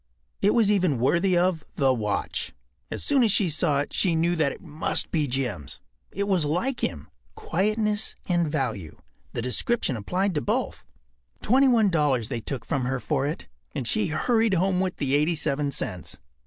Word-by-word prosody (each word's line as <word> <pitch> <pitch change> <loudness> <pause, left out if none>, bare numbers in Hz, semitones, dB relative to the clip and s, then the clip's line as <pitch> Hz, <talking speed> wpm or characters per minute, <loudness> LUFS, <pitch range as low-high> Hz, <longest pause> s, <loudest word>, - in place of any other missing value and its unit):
It 205 - +3
was 220 -4 +4
even 180 -9 +2
worthy 170 +9 +2
of 175 -2 +1
The 135 -2 +3
Watch. 105 -4 -2 0.4
As - - -3
soon 280 -2 +3
as 225 -3 +4
she 190 -4 +3
saw 150 -2 +1
it 145 - -6
she 175 -4 +2
knew 170 +2 +2
that 150 -4 +1
it - - -9
must 160 -3 -1
be 155 -3 +1
Jim’s. 125 - -2 0.3
It 200 0 -2
was 185 -5 +2
like 180 - -1
him. - - -3 0.3
Quietness 215 - 0
and 170 -4 +1
value—the 105 - -5
description 135 - 0
applied 180 - -1
to 150 - 0
both. - - -2 0.6
Twenty 265 +4 +4
one 225 -6 +4
dollars 145 -8 +1
they 120 -4 -3
took 125 +1 -5
from 130 -3 -1
her 130 +1 -1
for 140 0 -1
it, 150 - -5 0.3
and 125 - -3
she 105 - +1
hurried 225 +6 +2
home 185 +1 +1
with 185 -1 -1
the 140 -2 -1
87 150 -1 +1
cents. 90 -10 -4
160 Hz, 175 wpm, -26 LUFS, 135-195 Hz, 0.6 s, was